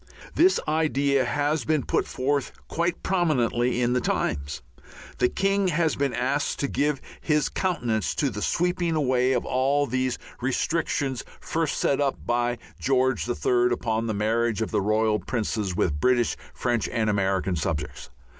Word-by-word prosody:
This 365 +4 +4
idea 140 -4 +2
has 145 +5 0
been 155 -4 +1
put - - 0
forth 140 +1 -1 0.2
quite 170 +1 -1
prominently 125 -9 +1
in 120 +1 +2
the 125 - +1
Times. 70 - -2 0.6
The 125 - +3
king 195 0 +1
has 165 -2 +1
been 140 -1 0
asked 130 +4 0
to 140 - +1
give 145 0 0 0.2
his 150 -3 +1
countenance 120 - -1
to - - 0
the - - -5
sweeping 175 -1 0
away 130 -3 +2
of 125 - 0
all 135 +3 +2
those 130 -1 -1 0.2
restrictions 135 0 -1 0.2
first 160 -2 -1
set 140 +1 +1
up 140 -2 -1
by 120 0 0 0.2
George 130 -1 +1
the 120 0 -1
Third, 125 0 +2
upon 115 -1 -1
the 110 - -1
marriage 115 +1 +1
of 100 - -5
the - - +1
Royal 110 +1 +2
Princes 105 -5 -2
with 75 -5 0
British, 125 -2 +2 0.2
French 120 -3 0
and 115 -2 0
American 95 -3 +1
subjects. 75 -7 -3
125 Hz, 155 wpm, -25 LUFS, 115-145 Hz, 0.6 s, This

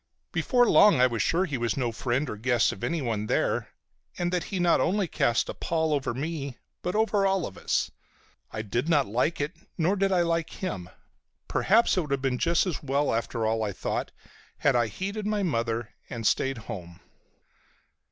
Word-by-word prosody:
Before 245 -3 +3
long 205 -10 +6
I 125 - +7
was 120 -3 0
sure 180 +3 +2
he 140 -8 -3
was 120 0 -1
no 125 -3 0
friend 125 +5 -1
or 105 - -4
guest 120 +2 +2
of 95 - -9
anyone 120 -10 -1
there, - - 0 0.5
and 175 0 -1
that 180 - 0
he 195 - -4
not 175 -1 +4
only 195 +1 +1
cast 120 -6 +1
a - - -4
pall 160 -2 0
over 135 -4 -1
me 140 -2 -4 0.2
but 180 - -2
over 215 -2 +2
all 190 -3 +1
of 95 - -7
us. - - -1 0.6
I 110 - -5
did 120 +8 -2
not 145 -5 +4
like 125 +10 0
it, 145 +4 -2 0.2
nor 175 +3 +2
did 195 0 +1
I 180 -2 +3
like 165 -1 0
him. 95 - -5 0.6
Perhaps 220 0 +3
it - - +4
would 150 - -7
have 140 -1 +1
been 130 -2 0
just 170 +1 +2
as 180 -5 -3
well 140 0 0
after 115 0 -1
all, 110 0 +1
I 105 -2 -1
thought, - - -3 0.5
had 145 -3 +2
I 120 -1 +3
heeded 200 - -4
my 210 -1 0
mother 115 - -1 0.2
and 115 -2 -5
stayed 135 +3 +2
home. 90 -6 -8
140 Hz, 195 wpm, -27 LUFS, 115-175 Hz, 0.6 s, I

